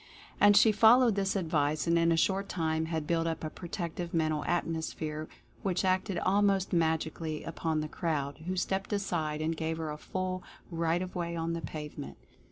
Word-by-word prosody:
And 205 0 +7
she 215 +1 +7
fol 220 +4 +7
lowed 240 -3 +4
this 195 0 0
advice, 155 -5 0
and 170 0 +3
in 165 0 +4
a 165 - +3
short 195 +3 +1
time 160 -2 0
had 160 -2 -2
built 165 +1 +1
up 165 -1 -3
a 155 - -3
Protective 170 -1 -5
Mental 155 -2 +1
Atmosphere 160 -2 -2 0.3
which 190 -1 0
acted 185 +1 +1
almost 195 0 +2
magically 160 -1 0
upon 160 -1 -2
the 155 - -3
crowd, 150 -4 -2
who 185 - -1
stepped 190 +3 -1
aside 160 -6 -1
and 165 +1 0
gave 160 0 -2
her 160 -2 -3
a 150 - -5
full 185 +1 -3 0.3
right 165 +1 0
of 185 - -7
way 170 -2 -3
on 165 0 -2
the 170 - -3
pavement. 150 -3 -7
165 Hz, 185 wpm, -30 LUFS, 160-185 Hz, 0.3 s, And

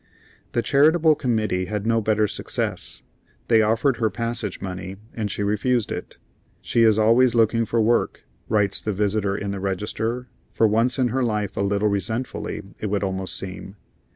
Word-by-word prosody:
The 120 - +1
charitable 155 +3 +4
committee 110 -9 0
had 105 +2 -4
no 115 0 +2
better 110 0 +2
success. - - -4 0.5
They 115 -2 +6
offered 115 +4 +2
her 110 -1 +1
passage 115 -1 -3
money, 95 0 -6 0.2
and 110 -3 -3
she 100 - -2
refused 105 +3 0
it. - - -6 0.4
"She 115 - 0
is 110 -2 +5
always 115 +3 +4
looking 115 0 +3
for 115 +2 0
work," 115 +2 +1 0.2
writes 105 -3 +1
the 105 - -2
visitor 100 0 0
in 100 0 -3
the 100 - -4
register, 110 +6 -3 0.2
for 110 - +2
once 115 +4 +2
in 125 -2 +2
her 130 +2 0
life 105 -4 -1
a - - -1
little 100 +1 +1
resentfully, 110 +5 -3 0.2
it 110 - -3
would 100 0 -1
almost 95 -1 -2
seem. 95 +1 -7
110 Hz, 170 wpm, -23 LUFS, 100-115 Hz, 0.5 s, They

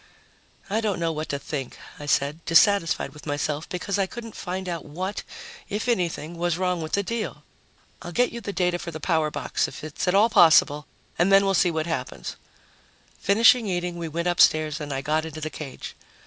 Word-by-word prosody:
"I 215 +3 0
don't 205 -5 -1
know 165 -1 0
what 155 0 -4
to 140 - -1
think," 140 -2 -5 0.2
I 145 - -7
said, 145 +3 0
dissatisfied 165 +1 +3
with 150 +1 -13
myself 145 +1 -2
because 195 +3 -2
I 195 - +2
couldn't 230 +1 -9
find 185 +1 -4
out 170 -2 -3
what, 185 +7 -4 0.5
if 210 +4 -3
anything, 175 -6 -1
was 175 -1 0
wrong 180 -2 0
with 155 - -6
the 200 - +2
deal. 230 +2 -4 0.6
"I'll 175 - -7
get 245 +8 +2
you 235 - -6
the 200 - -4
data 180 -2 0
for 175 - -6
the 160 -1 -7
power 160 -2 +1
box - - -1
if - - -10
it's 155 +2 -4
at 180 - +3
all 210 +3 +6
possible 155 -5 +5 0.3
and 180 +3 +3
then 195 0 +6
we'll 195 - +2
see 180 - +4
what 160 -2 -1
happens." 155 -7 -4 0.8
Finished 215 +4 +6
eating, 180 -6 -2
we 170 - -3
went 170 +2 -2
upstairs 155 -3 +3
and 145 -1 -5
I 135 0 -2
got 155 +2 +1
into 160 -1 -7
the 155 0 -4
cage. 140 -4 -8
170 Hz, 205 wpm, -25 LUFS, 155-195 Hz, 0.8 s, all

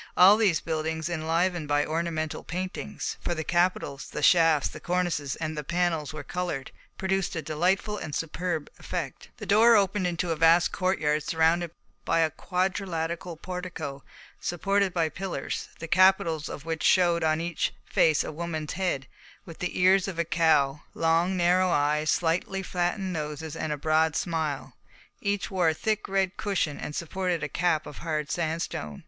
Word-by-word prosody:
All 190 +3 +9
these 205 -7 +2
buildings, 160 0 -2
enlivened 170 0 0
by 145 0 +2
ornamental 160 -1 -2
paintings, 180 - -4
for 175 - -1
the 160 - -3
capitals, 175 -5 0
the - - -5
shafts, 165 -4 +5
the - - -9
cornices, 175 -6 -1
and 155 -1 -4
the 150 - -4
panels 170 -2 0
were 155 0 -7
coloured, 175 -7 -4 0.3
produced 190 -1 -1
a 165 - -2
delightful 185 +7 0
and 150 -2 -5
superb 165 -1 -2
effect. 165 -8 -5
The - - -7
door 225 +3 +6
opened 200 -2 +2
into 170 0 -1
a - - +1
vast 165 +2 +5
court 185 0 0 0.2
surrounded 165 +2 +2 0.3
by 165 - +2
a 160 -1 +2
quadrilateral 180 -2 -2
portico 170 -6 -6 0.4
supported 195 +2 0
by 165 -3 +1
pillars, 180 -6 -4
the 165 - -7
capitals 175 -4 +3
of 145 - -8
which 160 -1 -3
showed 175 -2 +4
on 155 0 +2
each 170 -1 -1
face 155 -2 +3
a - - -5
woman's 155 -1 -4
head, 175 -8 -1 0.4
with 165 -4 -11
the 180 - -3
ears 185 +1 +5
of 190 -4 -5
a 170 - +1
cow, 160 -4 +2
long, 165 +3 +2
narrow 180 +1 +3
eyes, 150 -1 +1
slightly 175 +5 0
flattened 180 +1 -1
noses, 150 -1 -4
and 155 - -3
a 150 - -1
broad 155 +1 +2
smile; 155 -2 -2 0.5
each 200 0 -1
wore 180 -4 +3
a 160 - -1
thick 215 +4 -1
red 190 -1 0
cushion 190 -8 -1
and 150 - -5
supported 175 -1 -2
a - - 0
cap 155 +1 0
of 145 - -9
hard 155 -3 -2
sandstone. 160 - -3
170 Hz, 165 wpm, -27 LUFS, 155-180 Hz, 0.5 s, All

